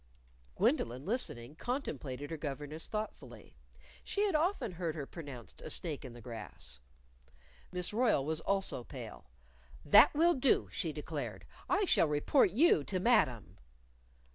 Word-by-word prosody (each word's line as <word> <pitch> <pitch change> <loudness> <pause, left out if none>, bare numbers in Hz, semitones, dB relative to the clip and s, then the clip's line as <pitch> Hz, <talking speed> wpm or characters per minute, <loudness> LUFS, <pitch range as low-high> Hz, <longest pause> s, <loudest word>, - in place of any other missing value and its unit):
Gwendolyn, 125 +4 +1
listening, 150 - -2
contemplated 145 - -4
her 160 - -3
governess 150 +1 -4
thoughtfully. 215 0 -6 0.5
She 405 - -1
had 410 - +1
often 315 - +1
heard 170 -3 -3
her 145 -3 -4
pronounced 140 -7 -10
a - - -7
snake 155 -5 -2
in 130 -3 -8
the 120 - -11
grass. 105 - -8 0.9
Miss 180 +2 -3
Royle 220 - +2
was 160 +1 0
also 195 -10 0
pale. 60 - -9 0.6
"That 205 +10 +8
will 340 +3 +5
do!" 265 -2 +2
she - - -2
declared. - - -5 0.2
"I 395 +2 +3
shall 170 - +4
report 150 - +3
you 220 - +4
to 185 - -2
Madam." 180 - +2
160 Hz, 140 wpm, -33 LUFS, -, 0.9 s, That